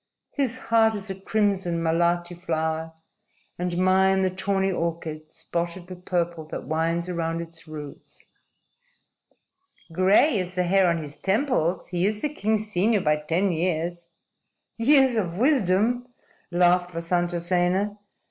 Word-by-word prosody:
His 260 Hz, -4 st, -1 dB
heart 225 Hz, -2 st, +2 dB
is 200 Hz, -1 st, -5 dB
a -, -, -2 dB
crimson 190 Hz, -4 st, 0 dB
malati 175 Hz, +1 st, +1 dB
flower, 160 Hz, -2 st, -2 dB, 0.7 s
and 175 Hz, -1 st, -2 dB
mine 190 Hz, +1 st, +3 dB
the 185 Hz, -, +1 dB
tawny 195 Hz, +1 st, 0 dB
orchid 165 Hz, -3 st, -4 dB
spotted 170 Hz, +1 st, -4 dB
with 180 Hz, 0 st, -11 dB
purple 170 Hz, -2 st, -1 dB
that 155 Hz, -, -6 dB
winds 165 Hz, +2 st, -1 dB
around 165 Hz, -2 st, -2 dB
its 165 Hz, -1 st, -9 dB
roots." 150 Hz, -2 st, -9 dB, 1.7 s
"Gray 200 Hz, -, +4 dB
is 180 Hz, 0 st, -4 dB
the 180 Hz, -, +1 dB
hair 190 Hz, +1 st, +3 dB
on 170 Hz, -2 st, -1 dB
his 145 Hz, 0 st, -8 dB
temples. 195 Hz, -, 0 dB
He 180 Hz, +1 st, +1 dB
is 210 Hz, 0 st, -3 dB
the 300 Hz, -, +1 dB
king's 215 Hz, -6 st, -1 dB
senior 210 Hz, +2 st, +2 dB
by 150 Hz, -2 st, +2 dB
ten 165 Hz, +6 st, 0 dB
years." 170 Hz, 0 st, -2 dB, 0.7 s
"Years 265 Hz, 0 st, +4 dB
of 175 Hz, -5 st, -2 dB
wisdom," 245 Hz, -, +2 dB, 0.4 s
laughed 175 Hz, 0 st, +3 dB
Vasantasena. 175 Hz, +4 st, 0 dB
180 Hz, 130 wpm, -25 LUFS, 170-200 Hz, 1.7 s, Gray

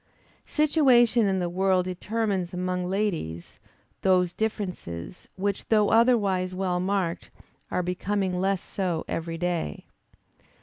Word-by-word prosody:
Situation 250 Hz, -7 st, +4 dB
in 190 Hz, -1 st, +1 dB
the 180 Hz, -1 st, 0 dB
world 185 Hz, +1 st, +1 dB
determines 190 Hz, -1 st, -2 dB
among 180 Hz, 0 st, -2 dB
ladies, 170 Hz, -, -3 dB, 0.4 s
those 180 Hz, -2 st, +3 dB
differences, 180 Hz, -, -4 dB
which 200 Hz, +1 st, -2 dB
though 215 Hz, -2 st, +3 dB
otherwise 205 Hz, -6 st, +3 dB
well 185 Hz, -1 st, 0 dB
marked, 185 Hz, -2 st, -1 dB, 0.4 s
are 180 Hz, -, -1 dB
becoming 185 Hz, +1 st, -1 dB
less 195 Hz, -1 st, 0 dB
so 180 Hz, -5 st, -2 dB
every 165 Hz, 0 st, -3 dB
day. 170 Hz, -, -2 dB
185 Hz, 115 wpm, -26 LUFS, 180-205 Hz, 0.4 s, Situation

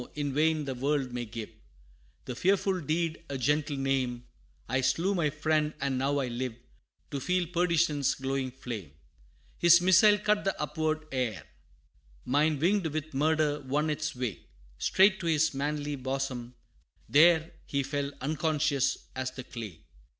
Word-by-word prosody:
in 145 Hz, -2 st, -2 dB
vain 155 Hz, +1 st, +2 dB
the 135 Hz, -, -3 dB
world 135 Hz, 0 st, -1 dB
may 120 Hz, -1 st, -3 dB
give 115 Hz, -1 st, -7 dB, 0.7 s
The 125 Hz, -, -4 dB
fearful 190 Hz, +4 st, +1 dB
deed 160 Hz, +1 st, -1 dB
a 140 Hz, -, -3 dB
gentle 145 Hz, +3 st, 0 dB
name 130 Hz, -3 st, -1 dB, 0.4 s
I 130 Hz, +3 st, 0 dB
slew 170 Hz, +9 st, +1 dB
my 170 Hz, -6 st, +1 dB
friend, 155 Hz, 0 st, 0 dB
and 140 Hz, -2 st, -1 dB
now 140 Hz, +2 st, +1 dB
I 135 Hz, -2 st, 0 dB
live 120 Hz, 0 st, -3 dB, 0.6 s
To 140 Hz, -, -2 dB
feel 180 Hz, +5 st, 0 dB
perdition's 170 Hz, -4 st, +1 dB
glowing 135 Hz, 0 st, -2 dB
flame. 115 Hz, -, -7 dB, 0.7 s
His 170 Hz, 0 st, +7 dB
missile 190 Hz, +4 st, +6 dB
cut 210 Hz, 0 st, +1 dB
the 195 Hz, -, -1 dB
upward 155 Hz, +1 st, -1 dB
air 125 Hz, -6 st, -2 dB, 0.8 s
Mine, 150 Hz, +3 st, +2 dB
winged 180 Hz, +4 st, +2 dB
with 155 Hz, 0 st, -4 dB
murder 150 Hz, +1 st, +1 dB
won 145 Hz, +3 st, -1 dB
its 150 Hz, -1 st, -3 dB
way, 125 Hz, -6 st, -4 dB, 0.3 s
Straight 190 Hz, 0 st, +4 dB
to 170 Hz, -, -4 dB
his 160 Hz, -1 st, +2 dB
manly 145 Hz, +1 st, -2 dB
bosom, 130 Hz, -2 st, -4 dB, 0.5 s
there 160 Hz, +2 st, +5 dB, 0.2 s
He 140 Hz, -1 st, 0 dB
fell, 140 Hz, +1 st, -2 dB
unconscious 150 Hz, -1 st, +1 dB, 0.2 s
as 130 Hz, 0 st, -2 dB
the 130 Hz, 0 st, -8 dB
clay! 110 Hz, -10 st, -8 dB
145 Hz, 150 wpm, -29 LUFS, 130-160 Hz, 0.8 s, His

